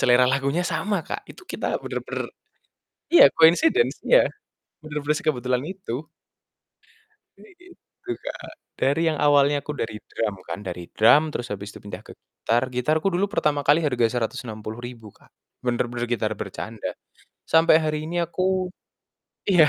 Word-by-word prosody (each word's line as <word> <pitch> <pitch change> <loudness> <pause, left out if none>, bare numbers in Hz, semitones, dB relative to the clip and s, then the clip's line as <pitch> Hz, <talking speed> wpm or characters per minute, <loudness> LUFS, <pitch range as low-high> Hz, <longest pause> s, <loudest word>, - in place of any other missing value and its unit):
selera 125 0 +5
lagunya 140 +6 +1
sama, 195 -2 -1
Kak, - - -6
itu 360 - -13
kita - - -2
bener-bener - - -4 0.8
iya, 345 - +9
coincidence 245 - +4
iya, - - +5 0.6
bener-bener 150 -1 -2
sekebetulan 130 -5 0
itu. 155 -7 -5 1.4
Ini 415 - -16
itu 355 +1 -14
Kak, - - -7 0.3
dari 145 +5 +2
yang 155 - -3
awalnya 145 0 +4
aku 150 - -4
dari 110 -6 -4
drum 105 -3 -2
kan, 85 +1 -5
dari 90 -3 -6
drum 115 +7 +6
terus 120 -2 -4
habis 100 0 -5
itu - - -11
pindah 100 - -8
ke - - -10
gitar, 120 +1 -1
gitarku 155 +9 +1
dulu 185 +3 +1
pertama 150 -8 +1
kali 150 +3 +5
harga 125 -5 +2
Rp160.000, 115 -1 -5
Kak, - - -24 0.3
bener-bener 120 -1 -1
gitar 110 -2 -1
bercanda, - - -5 0.5
sampai 160 -1 +6
hari 155 -1 -2
ini 175 - -2
aku 185 +2 0 0.8
iya, 170 -5 +6
145 Hz, 140 wpm, -24 LUFS, 120-165 Hz, 1.4 s, iya